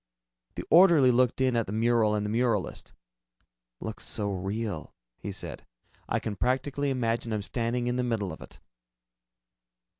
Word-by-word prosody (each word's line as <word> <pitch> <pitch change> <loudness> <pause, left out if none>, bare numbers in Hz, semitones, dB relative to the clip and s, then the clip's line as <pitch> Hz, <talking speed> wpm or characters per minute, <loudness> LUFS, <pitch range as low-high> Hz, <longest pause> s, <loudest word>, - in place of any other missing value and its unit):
The - - -4
orderly 165 -7 +7
looked 125 +1 +2
in 130 -2 +2
at 115 -2 0
the - - -5
mural 110 -1 +2
and 105 0 -1
the - - -2
muralist. 115 -4 -1 0.9
"Looks 110 0 -6
so 105 -2 -2
real," 95 -2 -4 0.2
he 100 - -5
said, 95 - -6 0.5
"I - - +1
can 105 - -4
practically 135 +4 0
imagine 115 -3 -1
I'm 105 -2 -2
standing 120 +2 -2
in 125 0 -1
the 125 - 0
middle 110 -6 -1
of - - -11
it." - - -12
115 Hz, 155 wpm, -28 LUFS, 105-125 Hz, 0.9 s, orderly